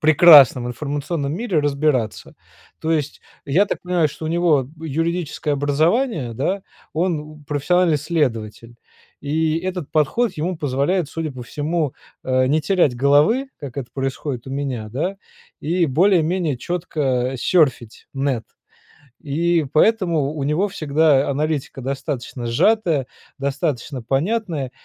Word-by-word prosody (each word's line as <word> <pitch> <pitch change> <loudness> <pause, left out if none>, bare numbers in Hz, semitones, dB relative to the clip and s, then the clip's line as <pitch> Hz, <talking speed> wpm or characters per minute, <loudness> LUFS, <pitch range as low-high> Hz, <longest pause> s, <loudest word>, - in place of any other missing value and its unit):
прекрасном 150 -6 +7
информационном 145 +3 -3
мире 190 -2 0
разбираться. 140 -6 -1 0.5
То 160 - -2
есть 150 -3 -1 0.2
я 170 +9 +3
так - - -3
понимаю, 180 -3 +1
что 155 - -9
у 155 - -2
него 160 -6 +2
юридическое 160 0 -2
образование, 150 - +1
да, 185 - -1 0.3
он, 170 -1 0
м, 150 - -17
профессиональный 160 +3 +2
следователь, 120 -7 -2 0.5
и 155 +2 0
этот 180 -3 -5
подход 185 - +1
ему 170 +3 -2
позволяет, 145 +5 0
судя 160 0 -4
по 130 -3 -9
всему, 150 +2 -2 0.3
э, 130 0 +2
не 155 +3 +2
терять 160 -6 +2
головы, 150 - +3
как 140 -3 -8
это 135 -4 -5
происходит 135 -1 -4
у - - -7
меня, 135 -5 -3
да, 160 - -3 0.4
и 170 +2 +1
более-менее 170 -1 +2
четко 135 -6 -1
серфить 135 -8 +1
нэт 135 -4 -1 0.8
и 165 +2 +1
поэтому 170 -6 +2
у 150 -3 -4
него 155 +8 +1
всегда 155 -5 +2
аналитика 145 -2 -2
достаточно 135 -2 -4
сжатая, 160 - +2 0.3
достаточно 135 -1 -2
понятная 155 - -1
150 Hz, 125 wpm, -21 LUFS, 135-170 Hz, 0.8 s, прекрасном